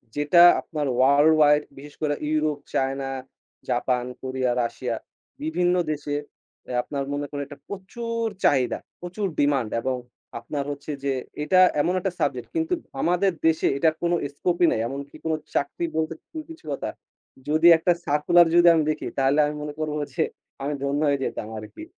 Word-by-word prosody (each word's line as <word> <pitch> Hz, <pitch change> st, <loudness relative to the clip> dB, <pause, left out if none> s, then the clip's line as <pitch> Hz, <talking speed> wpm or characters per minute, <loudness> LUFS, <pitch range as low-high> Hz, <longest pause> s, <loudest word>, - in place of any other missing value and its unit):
যেটা 150 Hz, +4 st, +4 dB, 0.2 s
আপনার 150 Hz, -3 st, -4 dB
world 140 Hz, +4 st, +5 dB
wide 150 Hz, -1 st, +5 dB, 0.2 s
বিশেষ 145 Hz, +1 st, -11 dB
করে 150 Hz, -1 st, +1 dB, 0.2 s
Europe, 155 Hz, -1 st, +1 dB, 0.2 s
China, 135 Hz, 0 st, -1 dB, 0.6 s
Japan, 125 Hz, 0 st, 0 dB, 0.2 s
Korea, 130 Hz, -1 st, -1 dB
Russia 115 Hz, 0 st, -3 dB, 0.5 s
বিভিন্ন 180 Hz, -, +1 dB, 0.2 s
দেশে 145 Hz, -1 st, -3 dB, 0.5 s
এ -, -, -5 dB
আপনার 140 Hz, -1 st, -3 dB
মনে 145 Hz, 0 st, -2 dB
করেন 145 Hz, -1 st, -4 dB
একটা 145 Hz, 0 st, -12 dB
প্রচুর 230 Hz, +4 st, -4 dB, 0.2 s
চাহিদা, 130 Hz, -3 st, +2 dB, 0.2 s
প্রচুর 180 Hz, +4 st, -4 dB
ডিমান্ড 140 Hz, -6 st, +2 dB
এবং 130 Hz, +1 st, -1 dB, 0.4 s
আপনার 140 Hz, +5 st, -4 dB
হচ্ছে 145 Hz, +2 st, -6 dB
যে, 140 Hz, -, +1 dB, 0.3 s
এটা 185 Hz, +4 st, +4 dB, 0.2 s
এমন 180 Hz, -, +1 dB
একটা 190 Hz, +1 st, -2 dB
সাবজেক্ট, 125 Hz, -3 st, -1 dB
কিন্তু 325 Hz, +2 st, 0 dB, 0.3 s
আমাদের 180 Hz, +3 st, +2 dB, 0.2 s
দেশে 160 Hz, -1 st, +2 dB
এটার 155 Hz, +2 st, +2 dB
কোনো 175 Hz, 0 st, +2 dB, 0.2 s
স্কোপ 175 Hz, +3 st, 0 dB
-ই -, -, +8 dB
নাই। -, -, 0 dB
এমনকি 140 Hz, +2 st, -7 dB
কোন 160 Hz, -, +1 dB, 0.2 s
চাকরি 145 Hz, +4 st, -1 dB
বলতে 160 Hz, 0 st, 0 dB, 0.2 s
কোনো 320 Hz, -, -5 dB
কিছু 325 Hz, -, -13 dB
কথা, -, -, -3 dB, 0.6 s
যদি 155 Hz, +3 st, +4 dB
একটা 165 Hz, +2 st, +2 dB
সার্কুলার 155 Hz, +4 st, +4 dB
যদি 175 Hz, 0 st, +6 dB
আমি 160 Hz, -, +3 dB
দেখি, 150 Hz, -, -5 dB
তাহলে 135 Hz, +2 st, +3 dB
আমি 150 Hz, -, -3 dB
মনে 150 Hz, 0 st, -5 dB
করবো 155 Hz, -1 st, -2 dB, 0.2 s
যে, -, -, +1 dB, 0.4 s
আমি 145 Hz, +2 st, -1 dB
ধন্য 140 Hz, +2 st, 0 dB
হয়ে 140 Hz, -1 st, +2 dB
যেতাম 105 Hz, -, -4 dB
আরকি। 110 Hz, -, -9 dB
150 Hz, 165 wpm, -24 LUFS, 140-170 Hz, 0.6 s, ই